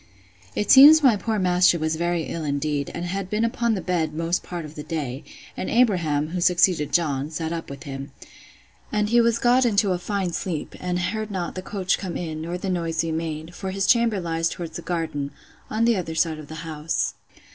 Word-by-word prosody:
It 210 - +1
seems 295 +3 +9
my 250 -5 +6
poor 220 +2 -2
master 180 -2 +4
was 160 0 -1
very 170 0 0
ill 165 +1 -5
indeed, 145 0 -1
and 170 - -4
had 190 +1 -3
been 215 +3 +1
upon 230 0 0
the 190 - -3
bed 160 -4 -1
most 165 +2 0
part 175 -3 -6
of 150 - -10
the 150 - -7
day; 145 -5 -4 0.3
and - - -4
Abraham 170 -11 +2
(who 180 +1 -3
succeeded 175 -4 +3
John) 145 -4 0
sat 160 +1 -3
up 165 -1 -5
with 140 -1 -8
him. 135 0 -7 0.8
And 210 0 0
he 235 +1 +5
was 230 0 +2
got 245 +2 +4
into 205 -4 +2
a 180 - 0
fine 190 -2 -2
sleep, 165 -5 -4
and 180 -1 -2
heard 215 +5 -2
not 185 -4 -3
the 185 - -5
coach 190 -1 -1
come 185 -4 -4
in, 160 -3 -5
nor 170 +2 -4
the 190 - -5
noise 165 -3 -1
we 165 - -2
made; 160 0 -4
for 190 +1 -5
his 195 0 -1
chamber 230 -2 +3
lies 165 -1 -1
towards 165 -2 -7
the - - -5
garden,—on 165 +6 -4
the 235 -1 +4
other 165 -3 -4
side 160 -1 +1
of 150 - -10
the 160 +2 -8
house. 155 0 -2
175 Hz, 210 wpm, -24 LUFS, 160-195 Hz, 0.8 s, seems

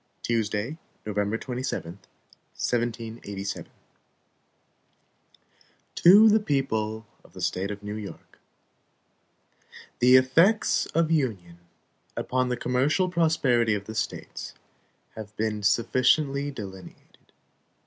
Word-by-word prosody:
Tuesday, 115 +5 -1 0.3
November 105 +1 -1
27, 125 -9 -4 0.6
1787. 115 -4 -3
HAMILTON - - -33 2.2
To 205 +6 +7
the 220 0 +5
People 110 - -1 0.2
of - - -21
the - - -11
State 90 +2 -1
of 105 0 -7
New 105 0 -5
York: 105 -2 -9 1.6
THE 125 +1 +6
effects 165 - +4
of 165 -1 0
Union 100 - -1 0.6
upon 130 0 0
the 125 - -1
commercial 140 +10 +1
prosperity 135 -10 +2
of 100 -1 -5
the 110 - -7
States 110 0 -5 0.6
have 110 -1 -10
been 110 -1 -1
sufficiently 130 +6 +2
delineated. 95 -8 -11
115 Hz, 95 wpm, -26 LUFS, 105-135 Hz, 2.2 s, To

